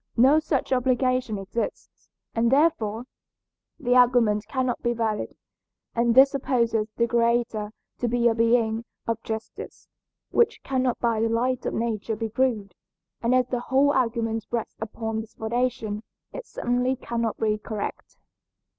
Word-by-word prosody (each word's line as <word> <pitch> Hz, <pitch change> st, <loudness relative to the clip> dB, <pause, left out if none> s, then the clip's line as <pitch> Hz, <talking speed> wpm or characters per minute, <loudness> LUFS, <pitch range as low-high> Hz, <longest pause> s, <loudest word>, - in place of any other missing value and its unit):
No 270 Hz, +6 st, +6 dB
such 280 Hz, -4 st, -1 dB
obligation 255 Hz, -3 st, +1 dB
exists, 195 Hz, +4 st, -5 dB, 0.2 s
and 230 Hz, +1 st, +2 dB
therefore 245 Hz, -7 st, +2 dB, 0.8 s
the 245 Hz, -, +1 dB
argument 240 Hz, -4 st, +4 dB
cannot 260 Hz, -2 st, -1 dB
be 240 Hz, 0 st, +1 dB
valid. 220 Hz, -2 st, -2 dB, 0.6 s
And 235 Hz, 0 st, +2 dB
this 270 Hz, +1 st, +8 dB
supposes 235 Hz, -5 st, 0 dB
the 235 Hz, -, +3 dB
Creator 235 Hz, -2 st, +1 dB, 0.3 s
to 245 Hz, -, 0 dB
be 240 Hz, 0 st, +2 dB
a 230 Hz, -, +4 dB
being 230 Hz, -1 st, +2 dB, 0.2 s
of 230 Hz, -1 st, -2 dB
justice, 220 Hz, 0 st, -7 dB, 0.4 s
which 470 Hz, -, +2 dB
cannot 260 Hz, -2 st, 0 dB
by 230 Hz, -2 st, +1 dB
the 225 Hz, -, +2 dB
light 245 Hz, +2 st, 0 dB
of -, -, -2 dB
nature 225 Hz, -1 st, -2 dB
be 225 Hz, +1 st, -3 dB
proved, 220 Hz, -5 st, 0 dB, 0.5 s
and 235 Hz, +2 st, +2 dB
as 255 Hz, -1 st, +2 dB
the 250 Hz, -, -1 dB
whole 270 Hz, +3 st, +3 dB
argument 230 Hz, -3 st, 0 dB
rests 235 Hz, -2 st, -4 dB
upon 220 Hz, 0 st, -3 dB
this 220 Hz, -, -14 dB
foundation 225 Hz, -2 st, -2 dB, 0.3 s
it -, -, -7 dB
certainly 250 Hz, +2 st, 0 dB
cannot 235 Hz, -3 st, -3 dB
be 215 Hz, -1 st, 0 dB
correct. 215 Hz, -1 st, -6 dB
235 Hz, 145 wpm, -25 LUFS, 225-255 Hz, 0.8 s, this